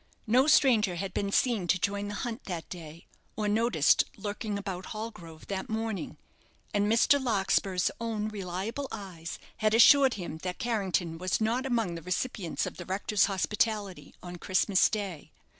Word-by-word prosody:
No 250 +5 +4
stranger 225 - +4
had 190 +1 -4
been 200 -1 -1
seen 225 -6 +1
to 185 - +3
join 200 +2 -1
the 205 - -5
hunt 240 +2 -5
that 175 -4 -5
day, 165 -2 -9 0.3
or 210 -1 -1
noticed 205 -8 +3
lurking 205 +1 -4
about 190 -2 -5
Hallgrove 175 -8 -8
that 195 +5 -4
morning, 220 -2 -3 0.6
and 205 +1 +2
Mr. 265 +4 +4
Larkspur's 195 -5 +1
own 225 -2 -2
reliable 205 +6 -4
eyes 175 -4 -7 0.2
had 215 -1 +2
assured 265 +3 +7
him 170 -5 -6
that 180 +1 -4
Carrington 190 -8 -1
was 185 0 0
not 235 +4 0
among 230 -8 0
the 165 - -6
recipients 180 +1 -2
of - - -7
the 175 - -7
rector's 195 +2 +1
hospitality 205 0 -1
on 175 0 -7
Christmas 190 +2 +3
day. 195 -8 -5
200 Hz, 160 wpm, -29 LUFS, 180-225 Hz, 0.6 s, assured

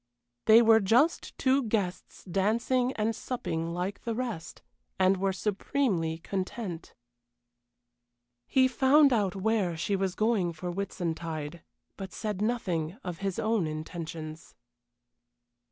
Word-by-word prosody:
They 225 +2 +8
were 225 -1 +7
just 245 - +2
two 265 +1 +3
guests 210 -6 -3
dancing 230 +7 +1
and 220 0 -1
supping 165 -11 -3
like 180 +3 -3
the 230 -1 -3
rest, 230 -10 -5 0.3
and 190 +1 +4
were 195 +1 +1
supremely 195 -4 -1
content. 185 0 -5 1.5
He 260 -1 +4
found 270 +2 +5
out 200 -4 +1
where 195 -4 0
she 200 +5 0
was 190 -1 -1
going 215 -6 +1
for 175 +2 -5
Whitsuntide, 165 -4 -4 0.4
but 190 -1 -6
said 210 -3 -3
nothing 190 -7 -1
of 175 -2 -5
his 195 -2 -2
own 215 -6 +1
intentions. 155 0 -7
195 Hz, 120 wpm, -29 LUFS, 170-225 Hz, 1.5 s, They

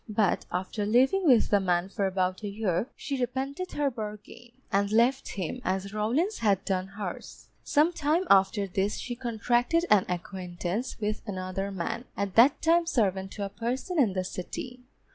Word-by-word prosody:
But 210 -2 +1
after 185 +4 -2
living 265 - +3
with 245 -5 +5
the 205 - +5
man 180 -1 +1
for 200 0 -1
about 185 0 -1
a 210 - -4
year, 200 -1 -1
she 275 -3 -4
repented 270 +8 -3
her 290 -2 0
bargain, 215 +1 -8 0.2
and 200 +1 +1
left 240 +5 +3
him, 195 +6 -4
as 190 +2 -2
Rawlins 255 - 0
had 200 -4 +2
done 185 -1 -1
hers. 195 -2 -7
Some 315 +3 +3
time 310 +3 +1
after 195 +1 +4
this 195 +2 -1
she 245 - -5
contracted 240 +6 +1
an 205 -3 +6
acquaintance 180 +6 -4
with 210 -1 -2
another 190 0 -3
man, 195 +5 -4
at 200 -2 -2
that 250 +5 +5
time 335 +1 +4
servant 195 - 0
to 205 - -3
a - - -5
person 255 - -3
in 225 -9 +3
the 185 -1 -1
City. 245 +7 -6
210 Hz, 170 wpm, -28 LUFS, 190-255 Hz, 0.2 s, an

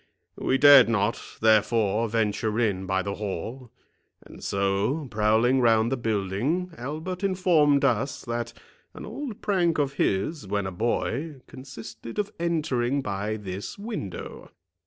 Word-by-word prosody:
We 130 - +1
dared 140 -4 +8
not, 110 -1 0 0.2
therefore, 110 0 +3
venture 110 0 0
in 95 -5 0
by 95 0 0
the 100 0 -3
hall; 110 +5 -5 0.5
and - - -13
so, 100 +10 0
prowling 110 +5 +3
round 115 0 +3
the - - +2
building, 115 - -1
Albert 160 +9 -5
informed 165 -7 +3
us, 130 +1 0
that 120 -1 -3 0.4
an - - -8
old 270 -8 -7
prank 175 -5 +1
of 140 -2 0
his, 100 - 0
when 100 0 -1
a 95 - -3
boy, 125 - -2
consisted 130 -3 -10
of 210 0 -1
entering 140 -6 0
by 100 +1 -2
this 100 -1 -6
window. 200 - -6
120 Hz, 135 wpm, -26 LUFS, 105-145 Hz, 0.5 s, dared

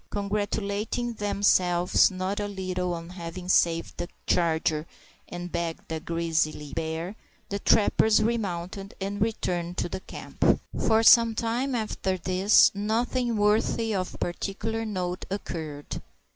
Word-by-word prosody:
Congratulating 205 +3 -2
themselves 185 -4 +3
not 185 +1 -3
a 205 - -1
little 185 -2 -2
on 165 0 -8
having 180 0 -7
saved 165 -2 +2
the 175 - -3 0.2
charger 160 -2 +1 0.4
and 175 0 -6
bagged 170 -1 -4
a 160 - -2
grizzly 160 -3 -1
bear, 165 +5 -3 0.3
the 200 - -2
trappers 220 +1 +4
remounted, 195 -4 -2
and 200 +1 -4
returned 180 -5 -1
to - - 0
the 175 - -5
camp. - - 0 0.3
For 225 0 +4
some 230 -1 +7
time 240 +4 -1
after 205 -4 -1
this 185 +4 +5
nothing 230 +3 0
worthy 215 +2 +2
of 185 -2 -3
particular 210 +5 -3
note 180 -3 -3
occurred. 160 -7 -5
190 Hz, 125 wpm, -27 LUFS, 175-215 Hz, 0.4 s, some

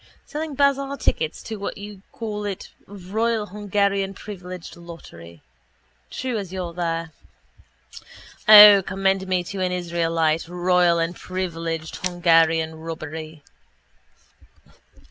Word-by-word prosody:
Selling 305 -1 -5
bazaar 275 0 +1
tickets 160 - -2
or 220 - -4
what 200 - -4
do - - -11
you 205 -2 -10
call 210 -2 -5
it 200 -2 -5 0.2
royal 210 +3 -2
Hungarian 200 -1 -1
privileged 185 -4 -9
lottery. 85 - -13 0.7
True 250 -4 -3
as 190 -3 -7
you're 180 -3 -5
there. 165 -1 -3 1.4
O, 210 -2 +11
commend 195 0 -1
me 185 -1 0
to 190 +3 -7
an 185 -1 0
israelite! 165 -2 0
Royal 180 0 +2
and 165 +1 -1
privileged 165 -4 -4
Hungarian 165 -2 +2
robbery. 160 -1 -7
180 Hz, 110 wpm, -23 LUFS, 165-205 Hz, 1.4 s, O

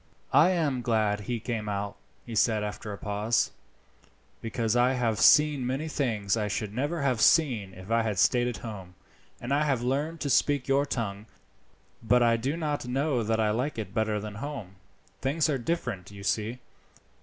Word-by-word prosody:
"I 145 +6 +6
am 155 -8 0
glad 110 -3 +1
he 120 +3 -3
came 110 -2 -3
out," 100 0 -3 0.3
he 120 - -8
said 110 -1 +2
after 105 +1 -5
a 100 - -6
pause, 105 +3 0 0.9
"because 115 0 -1
I 125 +2 +4
have 115 -4 0
seen 150 -3 +5
many 135 +5 -2
things 115 -10 0
I 105 -2 -1
should 105 0 -3
never 145 +6 -2
have 125 -5 +1
seen 115 - +3
if 95 +4 -10
I 115 0 +3
had 110 -3 -2
stayed 120 +6 +3
at 120 -3 -3
home, 95 -5 -8 0.4
and 120 +3 -3
I 145 +2 +3
have 135 -5 0
learned 145 +6 -1
to 145 - -1
speak 145 -1 +2
your 140 +1 +2
tongue. 105 -4 -3 0.7
But 120 +2 +3
I 115 -1 +4
do 135 +7 -2
not 150 -5 -2
know 135 0 0
that 110 0 0
I 110 -1 +2
like 125 +6 -2
it 100 -4 -5
better 110 -2 0
than 105 0 -6
home. 130 -10 -6 0.4
Things 145 +4 +1
are 135 - -1
different, 120 - -3
you 100 -1 -11
see. 110 +4 -1
115 Hz, 185 wpm, -28 LUFS, 105-135 Hz, 0.9 s, I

